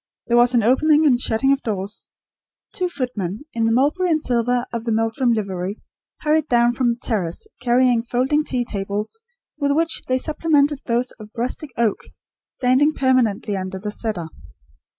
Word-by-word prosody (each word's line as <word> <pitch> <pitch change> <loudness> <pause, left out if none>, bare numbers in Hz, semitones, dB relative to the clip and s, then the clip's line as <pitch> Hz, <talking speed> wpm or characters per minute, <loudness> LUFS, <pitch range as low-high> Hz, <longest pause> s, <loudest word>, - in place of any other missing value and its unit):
There 240 - +2
was 245 +1 +5
an 235 - +3
opening 300 +6 +4
and 250 -5 +4
shutting 245 +3 +2
of 275 - -2
doors. 205 -2 -2 0.7
Two 365 -4 -1
footmen, 240 - -4
in 230 -1 0
the - - +2
mulberry 295 +10 +2
and 315 -2 +3
silver 245 -2 0
of 230 -1 -3
the 230 - -2
Meldrum 225 +3 +1
livery, 195 -2 -2 0.4
hurried 310 0 +1
down 240 0 +3
from 240 -1 +1
the 235 - -12
terrace, 185 -8 -2 0.2
carrying 245 -1 +3
folding 255 +6 0
tea 250 -5 -2
tables, 205 - -4 0.4
with 285 -1 +1
which 330 +2 +1
they 255 - +2
supplemented 295 -1 +1
those 240 +1 0
of 210 -1 -10
rustic 255 +5 -3
oak 230 -3 +1 0.5
standing 260 +4 +2
permanently 245 -6 +1
under 190 0 -4
the 210 +2 -5
cedar. 205 -7 -4
240 Hz, 165 wpm, -21 LUFS, 220-275 Hz, 0.7 s, was